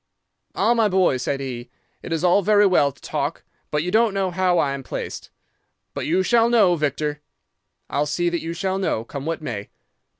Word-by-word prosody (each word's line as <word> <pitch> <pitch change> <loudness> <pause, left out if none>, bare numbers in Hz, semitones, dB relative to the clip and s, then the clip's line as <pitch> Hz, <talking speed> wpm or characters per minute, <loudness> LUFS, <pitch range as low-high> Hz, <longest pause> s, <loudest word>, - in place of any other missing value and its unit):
"'"Ah, 235 - +3
my 225 -3 +2
boy," 185 -7 +3
said 135 +2 -2
he, 125 -3 -6 0.3
"it - - -8
is 165 +1 -1
all 180 +3 +4
very 205 +1 +4
well 160 -7 +3
to - - -24
talk, - - -3 0.3
but 150 0 0
you 180 - -3
don't 220 -1 +3
know 190 -2 0
how 180 0 +1
I 140 -4 +1
am 140 - -5
placed. - - -6 0.6
But - - -4
you 180 +4 +2
shall 230 +3 +3
know, 210 -7 +4
Victor. 150 -1 -2 0.7
I'll 145 +1 -1
see 175 +4 0
that 170 -1 -2
you 165 +1 -4
shall 190 +2 -2
know, 145 - -1
come 140 +4 -7
what 165 -1 -3
may. 105 -7 -5
175 Hz, 200 wpm, -22 LUFS, 145-190 Hz, 0.7 s, all